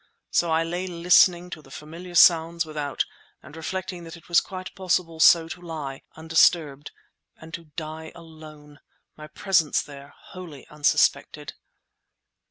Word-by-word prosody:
So 170 - +1
I 160 0 +2
lay 175 +3 -4
listening 175 0 +3
to 155 - -8
the 135 - -19
familiar 170 +5 -10
sounds 165 -1 +5
without 150 -3 -3 0.4
and 145 +4 -13
reflecting 180 +2 -5
that 165 +1 -10
it 165 - -19
was 170 - +5
quite 185 -1 -8
possible 180 -3 -1
so 165 +1 +6
to 175 - -8
lie, 155 -6 -7
undisturbed, 160 -2 +2 0.5
and 160 +1 -14
to 170 -2 -7
die 160 0 -7
alone, 155 -3 -14 0.4
my 150 0 -11
presence 170 -2 +1
there 140 -1 -13
wholly 170 -7 -12
unsuspected! 150 -1 0
165 Hz, 140 wpm, -24 LUFS, 155-175 Hz, 0.5 s, so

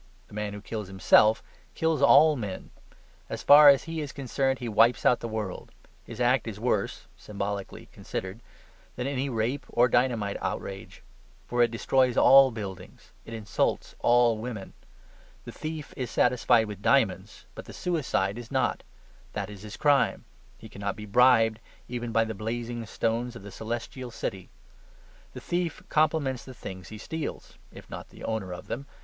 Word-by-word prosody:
The - - -16
man 105 -1 -4
who 105 - -8
kills 105 -1 -5
himself, 100 +3 +4 0.3
kills 160 -2 0
all 150 +2 +7
men; 105 -7 -6 0.6
as - - -5
far 145 0 +9
as 140 -1 +5
he 165 -1 -4
is 145 -2 -5
concerned 135 0 -1
he 125 - -6
wipes 115 +2 +3
out 125 - +4
the 115 - -5
world. 110 -4 -5 0.3
His 115 0 -10
act 125 0 +2
is 105 -2 -6
worse 110 -4 -1
(symbolically 100 -1 -5
considered) 95 +4 -6 0.6
than 125 - -4
any 135 0 -2
rape 120 +3 -1
or 120 +1 +3
dynamite 115 -5 +1
outrage. 95 0 -5 0.4
For 120 0 0
it 120 - +5
destroys 125 +2 +1
all 135 0 +8
buildings: 100 -6 -9
it 115 - -7
insults 105 -4 -1
all 120 -2 +3
women. 110 -4 -6 0.7
The - - -7
thief 155 -1 -6
is 125 -3 -4
satisfied 120 -2 +3
with 105 -2 -8
diamonds; - - +1
but - - -9
the - - -10
suicide 120 - -1
is 120 -1 -10
not: 130 -1 0 0.5
that - - -4
is 100 -2 -11
his 105 0 -9
crime. 145 -2 +2 0.3
He 110 - -12
cannot 100 -1 -4
be 105 - -8
bribed, 115 0 +4 0.3
even 120 -1 -4
by 115 0 +3
the 110 0 -4
blazing 115 +2 -4
stones 115 +3 -2
of 110 - -10
the 100 - -9
Celestial 120 +4 -5
City. 95 -5 -5 0.9
The - - -7
thief 175 -1 -2
compliments 150 -5 +1
the 130 - -11
things 95 -5 -9
he 110 - -9
steals, 160 +8 -6
if - - -13
not - - -9
the - - -14
owner 110 -5 -3
of 90 - -7
them. 135 +4 -6
115 Hz, 165 wpm, -27 LUFS, 105-130 Hz, 0.9 s, far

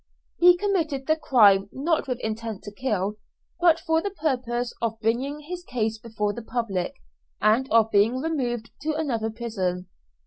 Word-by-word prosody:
He 355 0 +7
committed 330 -9 -1
the 315 - +3
crime 205 -10 +4
not 305 +4 0
with 250 -2 -1
intent 220 -1 -4
to 205 - -8
kill, 210 -3 -2 0.4
but 340 -2 +5
for 320 0 +1
the 405 - -2
purpose 250 -9 -2
of 225 -1 -2
bringing 255 +7 -1
his 350 +4 -7
case 225 -7 -2
before 210 -2 -2
the 235 - -6
public, 225 -6 -2 0.4
and 230 +5 +3
of 225 0 +4
being 215 +5 +3
removed 255 -7 -2
to 310 +1 -1
another 240 -8 -1
prison. 190 -6 -3
240 Hz, 160 wpm, -25 LUFS, 215-300 Hz, 0.4 s, He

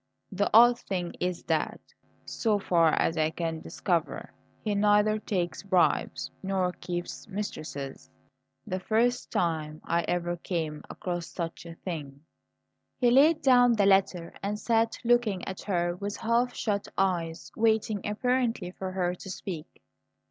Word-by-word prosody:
The 200 +1 0
odd 240 +2 +7
thing 180 -6 -3
is 180 -1 -2
that, - - -1 0.5
so 220 -3 0
far 170 -5 +3
as 165 - +1
I 155 0 +3
can 165 0 -3
discover, 170 -5 -2 0.3
he 210 - 0
neither 210 +1 +3
takes 175 -6 -2
bribes 190 -3 +1
nor 190 -2 0
keeps 175 -1 -6
mistresses 145 -10 -6 0.6
the 185 - -3
first 235 +5 +1
time 155 -3 -1
I 170 0 +1
ever 175 0 -1
came 160 -4 -3
across 175 -2 -4
such 170 -1 -6
a 165 - -9
thing.'" 145 -6 -6 0.8
He 245 -2 +4
laid 305 +5 +5
down 245 -3 +6
the 205 -3 +3
letter 190 -3 +2
and 205 +1 -2
sat 225 +1 +1
looking 235 -6 +2
at 190 - -5
her 175 -3 0
with 200 +2 -4
half 235 +2 +1
shut 205 -2 -1
eyes, 170 -4 -1
waiting, 220 -2 +1
apparently, 230 -3 0
for 185 0 -6
her 180 -1 0
to 185 +2 -9
speak. 175 -4 -7
190 Hz, 140 wpm, -28 LUFS, 170-215 Hz, 0.8 s, odd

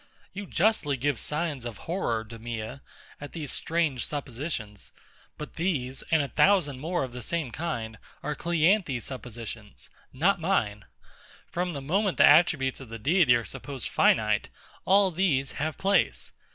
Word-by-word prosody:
You 200 0 -6
justly 170 -8 +2
give 140 -1 0
signs 150 -4 -1
of 120 -3 -6
horror, 120 -11 -1
DEMEA, 115 +2 -6 0.4
at 145 - -8
these 155 -5 -4
strange 160 -6 0
suppositions; 130 - -4 0.4
but 150 - -8
these, 140 -7 -1
and 160 -3 +4
a - - -3
thousand 150 -7 +3
more 170 +2 -1
of 130 -2 -6
the 125 - -6
same 155 +1 -2
kind, 115 -10 -4 0.2
are 150 - -1
CLEANTHES's 170 - +2
suppositions, 115 -4 -7 0.2
not 175 +7 +2
mine. 110 - 0 0.6
From 175 0 -2
the 140 - -5
moment 190 +7 0
the - - +8
attributes 150 -4 +5
of 130 -4 -10
the 115 - -6
Deity 145 - +4
are 115 -1 -1
supposed 135 -4 -6
finite, - - +3 0.4
all 195 0 +5
these 155 -7 +1
have 155 0 -1
place. 195 +1 +1
145 Hz, 150 wpm, -28 LUFS, 120-170 Hz, 0.6 s, the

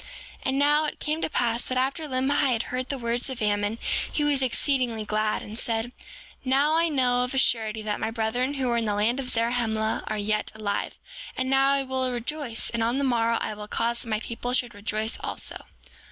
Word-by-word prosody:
7:14 - - -14 0.4
And 265 +1 +1
now, 295 +2 +4
it 300 - -4
came 310 +2 -1
to - - 0
pass 235 -4 +1
that 255 - -2
after 275 +5 0
Limhi 265 0 +2
had 230 +1 0
heard 255 0 -2
the 275 - -1
words 235 +1 0
of 260 -2 -4
Ammon, 205 +1 +1 0.3
he 300 - 0
was 290 -2 +3
exceedingly 250 -3 +1
glad, 215 0 0
and 215 +3 -6
said: 230 +1 0 0.5
Now, 275 +4 +3
I 335 +1 +3
know 250 -4 +2
of 250 +2 -3
a - - 0
surety 220 -4 +2
that 210 -1 -2
my - - -1
brethren 240 +4 -1
who 265 -2 -1
were 235 -1 +2
in 230 - 0
the 205 -1 0
land 225 +5 +1
of 255 -2 -2
Zarahemla 230 -2 0
are 215 - -2
yet 210 +1 -1
alive. 210 -2 -2 0.4
And 260 0 -1
now, 270 0 +5
I 275 -1 +1
will 260 -1 0
rejoice; 245 0 -2
and 235 - -1
on 235 +3 +1
the 280 - 0
morrow 230 -3 +2
I - - -2
will 210 0 -8
cause 235 +2 -1
that 230 - -7
my 215 -1 +1
people 240 +2 -4
shall 250 -1 +2
rejoice 215 +1 -2
also. - - -5
240 Hz, 220 wpm, -26 LUFS, 220-265 Hz, 0.5 s, now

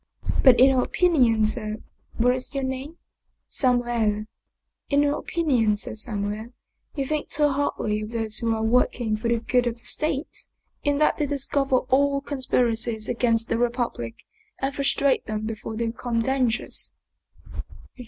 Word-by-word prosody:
" - - -1
But 260 -3 +7
in 265 +1 +6
my 255 - +3
opinion, 250 -11 +3
Ser 215 -1 -1 0.4
But 230 - 0
what 250 +1 +4
is 255 +2 -5
your 275 - -1
name? 265 +5 -4 0.2
" - - -51
" - - -45
Samuele." 240 -5 +1 0.3
" - - -54
In 285 0 +3
my 290 0 +2
opinion, 250 -11 +1
Ser - - -5
Samuele, 215 +1 -4 0.4
you 275 -2 -1
think 305 +2 -2
too 295 0 +2
hardly 250 -6 -1
of 215 - -5
those 225 -2 -2
who 230 -1 0
are 220 - -2
working 230 -1 +1
for 220 +2 -3
the 235 0 +2
good 245 +2 +1
of 235 0 -2
the - - -21
State, 305 -1 -2 0.4
in 290 -1 +1
that 305 - +2
they 295 - 0
discover 275 -2 +1
all 280 +1 +3
conspiracies 240 -5 0
against 230 -1 +2
the 230 - -1
Republic 240 - -2 0.4
and 270 +1 -2
frustrate 280 0 +1
them 215 0 -3
before 220 0 -5
they 230 +1 -1
become 235 +1 -3
dangerous." 250 -1 -1
245 Hz, 170 wpm, -24 LUFS, 225-275 Hz, 0.4 s, But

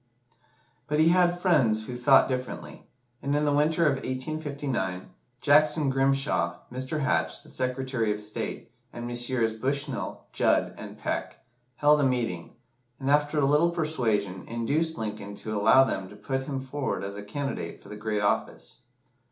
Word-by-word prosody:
But 150 0 0
he 160 +1 +5
had 175 0 +3
friends 115 - +3
who 125 - -6
thought 135 +2 +5
differently, 130 -1 -5 0.3
and 140 +1 0
in 150 +1 +1
the 145 - +2
winter 155 +3 +3
of 140 -3 +3
1859, 135 - -3 0.3
Jackson 150 -1 +4
Grimshaw, 135 -9 +1 0.2
Mr. 130 +4 -3
Hatch, 80 -9 0
the - - -14
Secretary 125 -3 -1
of 105 - -2
State, 105 0 -5 0.2
and 120 0 -7
Messrs. 120 -1 0
Bushnell, 135 +4 -3
Judd, - - +2
and - - -9
Peck, - - -4 0.3
held 150 +3 +4
a - - +2
meeting, 120 -11 -1 0.4
and, 135 0 0
after 145 +1 +2
a 140 - +3
little 150 +5 +4
persuasion, 115 - -1
induced 145 +8 0
Lincoln 105 -2 -5
to 110 +1 -5
allow 110 +6 +6
them 95 -7 -3
to 105 - -12
put 135 +5 -3
him 135 -2 -2
forward 135 -3 -3
as 100 +1 -5
a 105 - -6
candidate 105 -4 -4
for - - -16
the 105 - -7
great 105 -1 -2
office. 100 - -1
130 Hz, 160 wpm, -27 LUFS, 110-145 Hz, 0.4 s, allow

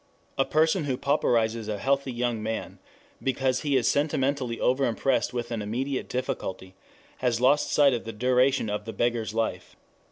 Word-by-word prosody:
A 135 - +2
person 160 +2 +2
who 130 -3 -1
pauperizes 115 -6 +1
a 105 -1 -2
healthy 135 +4 0
young 120 -2 -1
man 110 +1 -4 0.4
because 130 -1 0
he 145 -3 +1
is 125 - +1
sentimentally 140 -4 0
overimpressed 130 0 +1
with 120 -1 -4
an 115 -2 -2
immediate 130 +6 -3
difficulty 95 -7 -4 0.4
has 120 -2 0
lost 135 +4 +3
sight 140 -2 +5
of 120 - -2
the 115 - -4
duration 125 +3 +2
of 105 0 -3
the 115 - -6
beggar's 120 -2 -1
life. 110 -6 -2
125 Hz, 160 wpm, -26 LUFS, 115-135 Hz, 0.4 s, sight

